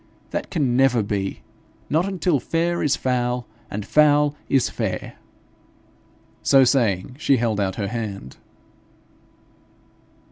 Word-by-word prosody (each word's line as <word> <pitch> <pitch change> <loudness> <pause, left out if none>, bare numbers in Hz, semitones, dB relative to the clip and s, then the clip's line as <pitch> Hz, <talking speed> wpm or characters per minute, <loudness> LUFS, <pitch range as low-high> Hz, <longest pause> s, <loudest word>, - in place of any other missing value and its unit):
That - - -3
can 140 -8 0
never 125 -3 +3
be 100 -1 -3 0.5
not 165 +5 +1
until 180 -6 0
fair 170 +5 -1
is 150 - +2
foul 125 -1 -1 0.2
and 105 0 -5
foul 150 +1 +4
is 135 -2 +3
fair.' - - -4 1.2
So 135 -1 +5
saying, 120 -3 +1
she 140 -3 +3
held 115 -3 0
out 95 -2 -1
her 100 -2 -3
hand. 105 - -6
125 Hz, 115 wpm, -22 LUFS, 105-150 Hz, 1.2 s, So